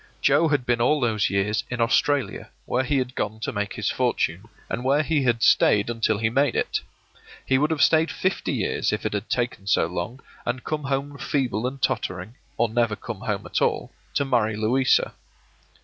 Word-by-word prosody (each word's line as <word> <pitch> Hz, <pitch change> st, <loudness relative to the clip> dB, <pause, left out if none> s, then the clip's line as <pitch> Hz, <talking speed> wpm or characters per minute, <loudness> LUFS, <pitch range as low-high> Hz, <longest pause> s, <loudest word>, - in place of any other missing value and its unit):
Joe 150 Hz, +4 st, +4 dB
had 145 Hz, -5 st, 0 dB
been 120 Hz, -1 st, +1 dB
all 150 Hz, +5 st, +3 dB
those 110 Hz, -5 st, +1 dB
years 100 Hz, +1 st, 0 dB
in 125 Hz, -, -4 dB
Australia, 125 Hz, 0 st, +1 dB, 0.2 s
where 130 Hz, -, 0 dB
he 140 Hz, +2 st, 0 dB
had 125 Hz, -1 st, -1 dB
gone 110 Hz, -2 st, -3 dB
to -, -, -2 dB
make 105 Hz, -1 st, -3 dB
his -, -, -1 dB
fortune, 90 Hz, +6 st, 0 dB, 0.2 s
and 120 Hz, -, -3 dB
where 140 Hz, +4 st, +3 dB
he 155 Hz, -1 st, +1 dB
had 120 Hz, -3 st, +1 dB
stayed 105 Hz, +1 st, +4 dB
until 110 Hz, -2 st, +1 dB
he 110 Hz, +1 st, +1 dB
made 135 Hz, +6 st, +1 dB
it. -, -, 0 dB, 0.7 s
He 130 Hz, 0 st, +2 dB
would 150 Hz, +2 st, +2 dB
have 160 Hz, -3 st, +2 dB
stayed 160 Hz, +1 st, +4 dB
fifty 190 Hz, -, -1 dB
years -, -, 0 dB
if -, -, -3 dB
it -, -, -1 dB
had 105 Hz, +1 st, -3 dB
taken 120 Hz, -5 st, -2 dB
so 95 Hz, -, +3 dB
long, 90 Hz, +9 st, -4 dB, 0.2 s
and 130 Hz, +1 st, -3 dB
come 150 Hz, -2 st, -3 dB
home 140 Hz, +1 st, -2 dB
feeble 125 Hz, -4 st, -1 dB
and 135 Hz, +2 st, -6 dB
tottering, 95 Hz, -4 st, -2 dB, 0.2 s
or 120 Hz, -, +3 dB
never 115 Hz, -1 st, +1 dB
come 110 Hz, -1 st, -7 dB
home 105 Hz, -4 st, -3 dB
at -, -, -2 dB
all, -, -, 0 dB, 0.2 s
to 140 Hz, -, +2 dB
marry 115 Hz, -5 st, +1 dB
Louisa. 120 Hz, +5 st, +2 dB
120 Hz, 195 wpm, -24 LUFS, 105-135 Hz, 0.7 s, Joe